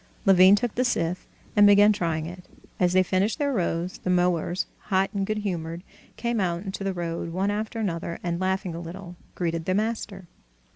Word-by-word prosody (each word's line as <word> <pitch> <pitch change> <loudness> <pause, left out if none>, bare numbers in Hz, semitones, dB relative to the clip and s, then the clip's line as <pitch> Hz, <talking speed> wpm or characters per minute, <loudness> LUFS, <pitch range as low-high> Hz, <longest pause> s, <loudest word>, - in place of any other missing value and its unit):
Levin 190 0 +7
took 235 +1 -2
the 255 - +1
scythe, 180 -7 -1 0.3
and 205 -1 +7
began 205 +1 +7
trying 165 -5 -1
it. 180 +2 -9 0.3
As 180 -1 +2
they 185 0 +5
finished 190 +4 0
their 285 -2 0
rows, 175 -3 -2
the - - -4
mowers, 180 0 +1 0.2
hot 195 0 +2
and 195 -1 -1
good 215 - -1
humored, 175 -4 -4 0.3
came 235 0 -1
out 175 -2 -1
into 195 0 -5
the 195 - 0
road 170 -2 -4
one 190 +4 0
after 215 +2 -3
another, 170 -5 -3
and, 175 0 -2
laughing 190 -1 -1
a 165 - -5
little, 175 +1 -8 0.2
greeted 165 -2 -2
the 185 - +1
master. 210 -3 -2
185 Hz, 190 wpm, -25 LUFS, 175-205 Hz, 0.3 s, Levin